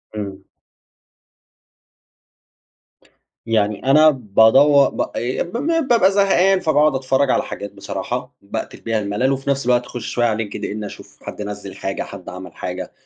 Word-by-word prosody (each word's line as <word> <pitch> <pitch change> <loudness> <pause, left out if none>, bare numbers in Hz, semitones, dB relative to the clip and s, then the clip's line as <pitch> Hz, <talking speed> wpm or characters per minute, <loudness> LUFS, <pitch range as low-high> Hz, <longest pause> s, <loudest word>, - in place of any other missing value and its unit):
إمم. 100 -2 -6 3.0
يعني 105 -1 0
أنا 155 +4 +6
بادوَر 135 +3 +4
ب - - -4
ي 120 +2 -1
ب 175 - -11 0.4
بابقى 210 -6 +5
زهقان 195 -1 +3
فباقعد 155 -4 +2
أتفرّج 130 +1 +1
على - - +1
حاجات 100 - -7
بصراحة - - -5
باقتل - - -6
بيها 115 -1 -1
الملل 105 +6 0
وفي 135 +1 -3
نفس 140 -1 0
الوقت 125 0 +2
أخُش 120 -1 -7
شوية 120 - 0
على 110 -1 -2
LinkedIn 105 +1 -5
أشوف - - -12
حد - - -7
نزِّل 100 -1 -7
حاجة، 95 - -3
حد 95 -3 -10
عمل 90 +1 -9
حاجة. 90 0 -5
120 Hz, 140 wpm, -20 LUFS, 105-140 Hz, 3.0 s, أنا